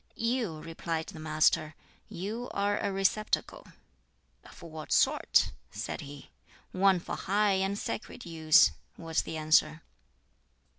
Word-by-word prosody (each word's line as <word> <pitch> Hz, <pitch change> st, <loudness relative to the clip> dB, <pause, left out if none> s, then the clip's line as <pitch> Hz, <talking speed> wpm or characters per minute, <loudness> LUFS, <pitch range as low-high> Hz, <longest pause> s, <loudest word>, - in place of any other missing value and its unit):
"You," 230 Hz, -8 st, -1 dB
replied 165 Hz, 0 st, -4 dB
the 160 Hz, -, -10 dB
Master 155 Hz, 0 st, +1 dB, 0.3 s
"You 215 Hz, +7 st, -5 dB
are 205 Hz, +1 st, +1 dB
a -, -, -1 dB
receptacle." 195 Hz, +2 st, -1 dB, 0.8 s
"Of -, -, -15 dB
what 160 Hz, -2 st, -9 dB
sort?" -, -, +3 dB, 0.2 s
said -, -, -5 dB
he. 145 Hz, 0 st, -11 dB, 0.4 s
"One 190 Hz, -1 st, +3 dB
for -, -, -5 dB
high 200 Hz, 0 st, +1 dB
and 195 Hz, +1 st, -1 dB
sacred 220 Hz, +2 st, -5 dB
use," 160 Hz, -, +5 dB, 0.3 s
was 165 Hz, -1 st, -1 dB
the 160 Hz, -, -6 dB
answer. 155 Hz, +1 st, +2 dB
170 Hz, 120 wpm, -30 LUFS, 155-200 Hz, 0.8 s, use